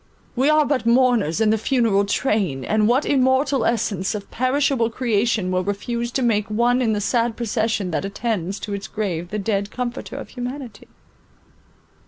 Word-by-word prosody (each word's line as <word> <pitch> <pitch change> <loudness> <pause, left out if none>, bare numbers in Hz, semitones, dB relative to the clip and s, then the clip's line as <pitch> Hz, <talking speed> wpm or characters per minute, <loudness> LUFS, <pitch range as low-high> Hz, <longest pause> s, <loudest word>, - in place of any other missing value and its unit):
We 265 +4 +2
are 305 0 +4
but 265 -5 -1
mourners 235 - +3
in 220 -1 +3
the 220 - +1
funeral 220 -5 +2
train, 200 - 0
and 215 0 +2
what 250 +5 +2
immortal 265 0 +2
essence 210 -4 0
or 210 - -3
perishable 255 +1 0
creation 225 -5 0
will 185 0 0
refuse 235 +5 -3
to 265 - 0
make 210 -4 +1
one 240 +4 +2
in 225 -3 +1
the 210 - 0
sad 230 +1 0
procession 220 -4 -1
that 160 - -1
attends 200 -2 -3
to 205 - -5
its 200 0 -5
grave 175 -5 -3
the 210 - -3
dead 200 -1 -1
comforter 250 +3 -5
of 275 - -8
humanity? 250 -3 -7
225 Hz, 170 wpm, -22 LUFS, 205-250 Hz, -, are